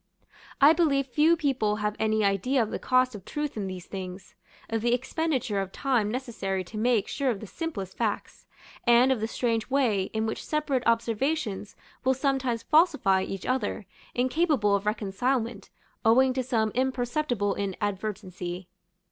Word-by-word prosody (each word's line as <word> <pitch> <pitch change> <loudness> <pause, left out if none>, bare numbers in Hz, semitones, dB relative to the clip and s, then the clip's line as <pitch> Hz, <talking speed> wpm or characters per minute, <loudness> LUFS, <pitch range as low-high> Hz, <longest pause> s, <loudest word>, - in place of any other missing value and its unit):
I 290 +3 +8
believe 285 -5 +2
few 305 +6 +3
people 260 -9 +1
have 210 0 -2
any 220 0 +2
idea 215 +7 +2
of 220 - -5
the - - -3
cost 255 0 +2
of 205 -3 -9
truth 295 +7 -4
in 205 -3 -3
these 185 -2 -7
things; 185 -1 -7 0.3
of 225 -1 -1
the 240 +1 +3
expenditure 255 -6 -1
of 190 -1 -5
time 245 -5 +1
necessary 215 -6 -3
to 215 +5 -9
make 235 -2 +2
sure 275 -2 -1
of 220 -5 -1
the 220 - -8
simplest 200 - -5
facts, 220 -3 -3 0.4
and 240 +2 +6
of 260 - +1
the 220 - -1
strange 230 -1 -1
way 240 -8 +2
in 220 0 -1
which 220 - -3
separate 300 -4 0
observations 230 -1 0 0.3
will 260 +1 +3
sometimes 265 -4 0
falsify 295 - +4
each 195 0 -5
other, 245 -5 -1 0.3
incapable 255 -4 +2
of 200 +1 -2
reconcilement, 220 +2 -1 0.3
owing 255 +3 +5
to 260 - 0
some 230 -4 0
imperceptible 245 -3 0
inadvertency. 190 -2 -4
230 Hz, 155 wpm, -27 LUFS, 205-265 Hz, 0.4 s, I